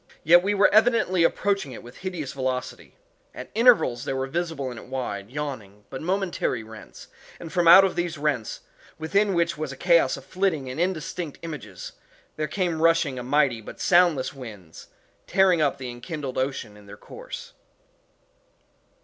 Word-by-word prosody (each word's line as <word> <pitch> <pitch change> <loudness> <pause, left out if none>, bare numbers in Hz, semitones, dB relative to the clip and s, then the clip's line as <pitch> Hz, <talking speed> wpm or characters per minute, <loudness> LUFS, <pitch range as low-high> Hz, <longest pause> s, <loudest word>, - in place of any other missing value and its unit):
Yet 175 +2 +7
we 205 +3 0
were 200 0 +4
evidently 215 -5 +4
approaching 195 -4 0
it - - -10
with 120 +1 -13
a - - -15
hideous 175 -8 -5
velocity. 130 -1 -4 0.4
At 125 - -9
intervals 220 - +4
there 135 - -3
were 130 0 -1
visible 160 -3 -3
in 120 - -8
it - - -13
wide, 115 -6 -5
yawning, 125 -8 -6
but 130 - -6
momentary 180 - -1
rents, 110 0 -12 0.3
and 165 - -9
from 175 -2 +2
out 190 +3 +9
these 175 -2 -2
rents, 140 -7 -2 0.4
within 195 +5 +1
which 170 -1 0
was 155 -3 -3
a 135 - -9
chaos 170 -6 +3
of 135 - -12
flitting 180 -8 -1
and 130 - -6
indistinct 175 -3 -3
images, 130 - -8 0.4
there 155 0 -2
came 175 -4 -2
rushing 165 -5 +2
and 125 +1 -7
mighty, 135 -5 +2
but - - -11
soundless 175 -8 +3
winds, 105 -11 -11 0.4
tearing 185 -3 +3
up 145 -2 +1
the 130 -2 -6
enkindled 135 +2 -6
ocean 130 -5 -3
in 105 -1 -16
their - - -11
course. - - -10
150 Hz, 165 wpm, -25 LUFS, 130-175 Hz, 0.4 s, out